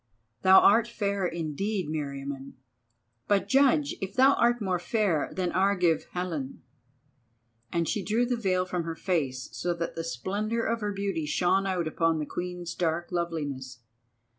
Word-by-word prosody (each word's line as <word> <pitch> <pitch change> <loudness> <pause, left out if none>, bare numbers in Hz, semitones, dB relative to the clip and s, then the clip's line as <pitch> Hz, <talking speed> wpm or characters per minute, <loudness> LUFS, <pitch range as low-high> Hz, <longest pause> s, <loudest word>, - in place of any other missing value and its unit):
Thou 190 0 +8
art 225 +3 +5
fair 200 -5 -1
indeed, 175 +4 -2
Meriamun, 140 -2 -5 0.7
but 200 -1 +2
judge 280 +3 +3
if 190 0 -5
thou 265 +2 +6
art 240 0 +2
more 185 -4 -1
fair 185 -5 0
than 180 -2 -2
Argive 180 -4 +2
Helen," 160 -9 -4 1.1
and 170 -1 0
she 205 - -1
drew 225 +5 +1
the 245 0 0
veil 185 -5 0
from 180 -2 -2
her 165 0 -4
face 140 -9 -2
so 175 0 -2
that 170 0 -3
the 165 - -4
splendour 205 - -2
of 230 0 -1
her 210 0 -1
beauty 195 -6 -2
shone 185 +5 +2
out 180 -4 -1
upon 165 0 +1
the 150 - -2
Queen's 175 +1 -5
dark 170 0 -1
loveliness. 145 -7 -3
180 Hz, 155 wpm, -28 LUFS, 160-205 Hz, 1.1 s, Thou